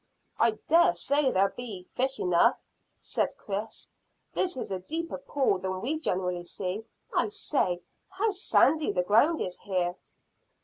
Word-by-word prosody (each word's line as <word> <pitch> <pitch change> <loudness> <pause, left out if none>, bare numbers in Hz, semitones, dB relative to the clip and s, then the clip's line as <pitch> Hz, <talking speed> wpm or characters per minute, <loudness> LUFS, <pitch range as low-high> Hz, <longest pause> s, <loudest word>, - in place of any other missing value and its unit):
"I 230 -2 +3
dare 330 - +5
say 280 +10 +2
there'll 195 +1 +2
be 220 -7 -6
fish 265 +1 0
enough," 175 -1 +4 0.4
said - - -2
Chris. 205 +2 -5 0.4
"This 360 -6 +1
is 250 - -4
a 190 - -2
deeper 320 - -3
pool 270 -9 +1
than 185 0 -3
we 290 +10 -2
generally 180 - -1
see. 190 +5 -4 0.3
I - - +3
say, 235 - -1 0.3
how 395 +3 0
sandy 320 -5 +3
the 180 - +1
ground 230 - +4
is 180 -1 -3
here!" 180 -2 -1
215 Hz, 145 wpm, -28 LUFS, 185-300 Hz, 0.4 s, dare